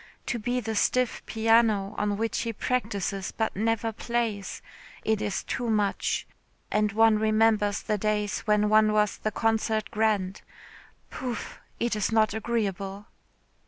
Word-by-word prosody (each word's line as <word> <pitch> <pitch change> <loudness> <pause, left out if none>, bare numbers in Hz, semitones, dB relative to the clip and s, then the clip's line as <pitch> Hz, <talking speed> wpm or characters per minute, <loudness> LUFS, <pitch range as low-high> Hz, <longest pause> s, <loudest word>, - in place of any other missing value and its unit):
To 240 - -2
be 245 +3 -1
the 225 -2 -3
stiff 250 +3 +1
piano 220 -3 +3
on 205 -1 -1
which 225 +1 -1
he 230 -1 -2
practises 200 -5 -2
but 220 - -2
never 225 +2 0
plays. 225 -3 -3 0.4
It 220 -1 +1
is 200 - -2
too 240 -2 -3
much. 210 -2 0 0.5
And 210 0 +2
one 220 0 +4
remembers 215 -1 +2
the 210 -2 -1
days 210 -1 0
when 210 0 +3
one 215 0 +4
was 210 -1 +1
the 215 - -1
concert 220 0 0
grand. 210 -3 0 0.7
Pouf. 250 -3 -5 0.2
It 235 -1 0
is 210 0 0
not 220 -2 +3
agreeable." 205 -3 -2
215 Hz, 140 wpm, -27 LUFS, 205-225 Hz, 0.7 s, one